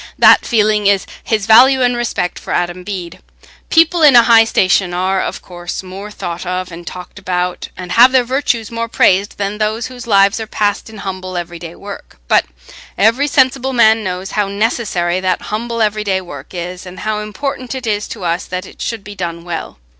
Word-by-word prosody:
That -, -, +6 dB
feeling 215 Hz, -2 st, +2 dB
is 200 Hz, -1 st, +3 dB, 0.2 s
his 215 Hz, -3 st, -1 dB
value 255 Hz, +4 st, +6 dB
and 245 Hz, 0 st, +2 dB
respect 235 Hz, -7 st, -2 dB
for -, -, -5 dB
Adam 175 Hz, +1 st, -2 dB
Bede. 180 Hz, -3 st, -6 dB, 0.5 s
People 330 Hz, +1 st, +4 dB
in 295 Hz, -4 st, +7 dB
a 240 Hz, -, +9 dB
high 230 Hz, -1 st, +6 dB
station 185 Hz, -4 st, +2 dB
are 185 Hz, +1 st, 0 dB
of -, -, -4 dB
course 175 Hz, +1 st, -6 dB
more 190 Hz, +3 st, -8 dB
thought 175 Hz, -4 st, -6 dB
of 180 Hz, 0 st, -3 dB
and 170 Hz, 0 st, -10 dB
talked 180 Hz, +2 st, -9 dB
about 180 Hz, -1 st, -2 dB
and 180 Hz, -1 st, -7 dB
have 245 Hz, +3 st, +7 dB
their 260 Hz, -1 st, +4 dB
virtues 245 Hz, -3 st, -1 dB
more 230 Hz, 0 st, -3 dB
praised, 200 Hz, -3 st, +2 dB
than 205 Hz, +1 st, -3 dB
those 215 Hz, +2 st, -1 dB
whose 250 Hz, -2 st, -9 dB
lives 200 Hz, 0 st, +4 dB
are 220 Hz, -, -5 dB
passed 205 Hz, 0 st, -1 dB
in 220 Hz, -, -11 dB
humble 185 Hz, -1 st, -5 dB
everyday 170 Hz, -1 st, -6 dB
work; 200 Hz, 0 st, -10 dB
but -, -, +3 dB, 0.5 s
every 230 Hz, +7 st, +3 dB
sensible 265 Hz, -1 st, +2 dB
man 220 Hz, -2 st, +4 dB
knows 185 Hz, 0 st, -4 dB
how 210 Hz, -2 st, 0 dB
necessary 200 Hz, -4 st, -1 dB
that 185 Hz, -1 st, 0 dB
humble 230 Hz, +1 st, -1 dB
everyday 210 Hz, -2 st, 0 dB
work 180 Hz, -2 st, -10 dB
is, 180 Hz, +1 st, -6 dB
and 180 Hz, -, -9 dB
how 215 Hz, -1 st, -1 dB
important 255 Hz, +4 st, -5 dB
it 260 Hz, -2 st, -6 dB
is 210 Hz, -1 st, -1 dB
to 210 Hz, -, -8 dB
us 170 Hz, +1 st, -1 dB
that 185 Hz, +1 st, -5 dB
it -, -, -13 dB
should 230 Hz, -3 st, -3 dB
be 205 Hz, -, -9 dB
done 170 Hz, -3 st, -5 dB
well. 170 Hz, -, -5 dB
205 Hz, 195 wpm, -16 LUFS, 185-230 Hz, 0.5 s, a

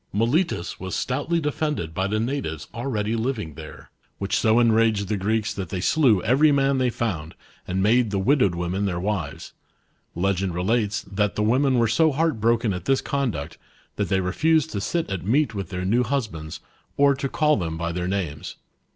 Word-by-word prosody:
Miletus 120 Hz, -, 0 dB
was 95 Hz, 0 st, -4 dB
stoutly 145 Hz, +7 st, -1 dB
defended 150 Hz, -, -2 dB
by 95 Hz, +3 st, -1 dB
the 105 Hz, +2 st, -1 dB
natives 115 Hz, -, -3 dB
already 115 Hz, -3 st, -2 dB
living 110 Hz, -, -2 dB
there, 75 Hz, +1 st, -11 dB, 0.3 s
which 100 Hz, 0 st, -2 dB
so 110 Hz, +1 st, +3 dB
enraged 110 Hz, -4 st, +3 dB
the 105 Hz, -, +1 dB
Greeks 110 Hz, +3 st, -1 dB
that 95 Hz, -5 st, -5 dB
they 95 Hz, -, -3 dB
slew 115 Hz, -, +3 dB
every 135 Hz, +7 st, +4 dB
man 140 Hz, -1 st, +2 dB
they 130 Hz, -1 st, +2 dB
found 90 Hz, -10 st, -3 dB, 0.3 s
and 95 Hz, +1 st, -1 dB
made 115 Hz, +2 st, +3 dB
the 100 Hz, -, -1 dB
widowed 100 Hz, -3 st, +2 dB
women 90 Hz, +3 st, -2 dB
their 90 Hz, -2 st, -2 dB
wiv^s. 95 Hz, -5 st, -3 dB, 0.6 s
Legend 95 Hz, 0 st, 0 dB
relates, 105 Hz, +3 st, 0 dB
that 105 Hz, 0 st, -1 dB
the 105 Hz, -, 0 dB
women 130 Hz, +4 st, +3 dB
were 115 Hz, -1 st, +3 dB
so 155 Hz, +8 st, +3 dB
heart 150 Hz, -5 st, 0 dB
broken 115 Hz, -2 st, +2 dB
at 90 Hz, -, -6 dB
this 135 Hz, -1 st, +3 dB
conduct, 90 Hz, -, -3 dB, 0.4 s
that -, -, -2 dB
they 95 Hz, 0 st, +2 dB
refused 155 Hz, -, +1 dB
to 100 Hz, -, -3 dB
sit 165 Hz, +11 st, -1 dB
at 95 Hz, -3 st, -4 dB
meat 125 Hz, +4 st, +1 dB
.with 100 Hz, -2 st, -5 dB
their 90 Hz, -1 st, -4 dB
new 115 Hz, +6 st, +2 dB
hus 130 Hz, +1 st, 0 dB
bands, 80 Hz, -6 st, -8 dB, 0.4 s
or 140 Hz, 0 st, +5 dB
to 135 Hz, 0 st, -3 dB
call 150 Hz, +1 st, +2 dB
them 80 Hz, -4 st, -3 dB
by 85 Hz, +1 st, -2 dB
their 90 Hz, +1 st, -3 dB
names. 90 Hz, -7 st, -3 dB
110 Hz, 190 wpm, -24 LUFS, 95-135 Hz, 0.6 s, or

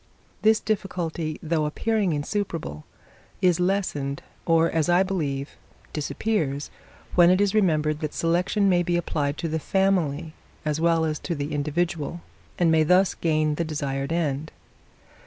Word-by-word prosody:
This 220 Hz, 0 st, +4 dB
difficulty, 170 Hz, -6 st, -2 dB
though 160 Hz, -1 st, 0 dB
appearing 210 Hz, +4 st, 0 dB
insuperable, 150 Hz, -, -3 dB, 0.5 s
is 180 Hz, -3 st, +3 dB
lessened, 180 Hz, -7 st, -1 dB, 0.2 s
or, 165 Hz, 0 st, +4 dB
as 165 Hz, +1 st, +1 dB
I 175 Hz, +2 st, +5 dB
believe, 145 Hz, -8 st, -2 dB, 0.4 s
disappears, 150 Hz, -2 st, -2 dB, 0.4 s
when 175 Hz, -1 st, +6 dB
it 185 Hz, +1 st, +4 dB
is 205 Hz, -1 st, +2 dB
remembered 155 Hz, -7 st, +2 dB
that 155 Hz, -2 st, -4 dB
selection 180 Hz, +5 st, +1 dB
may 180 Hz, -2 st, +4 dB
be 175 Hz, 0 st, 0 dB
applied 145 Hz, -4 st, -1 dB
to 165 Hz, -, -2 dB
the 160 Hz, 0 st, -1 dB
family, 165 Hz, -5 st, 0 dB, 0.3 s
as 150 Hz, +1 st, -1 dB
well 165 Hz, -1 st, +3 dB
as 155 Hz, -1 st, -2 dB
to 170 Hz, -, -3 dB
the 145 Hz, +1 st, -4 dB
individual, 160 Hz, +2 st, -2 dB, 0.4 s
and 170 Hz, -2 st, +3 dB
may 160 Hz, -1 st, +4 dB
thus 180 Hz, +4 st, +4 dB
gain 155 Hz, -2 st, +1 dB
the 170 Hz, -, -1 dB
desired 140 Hz, -3 st, -3 dB
end. 155 Hz, -2 st, -1 dB
165 Hz, 145 wpm, -25 LUFS, 150-180 Hz, 0.5 s, when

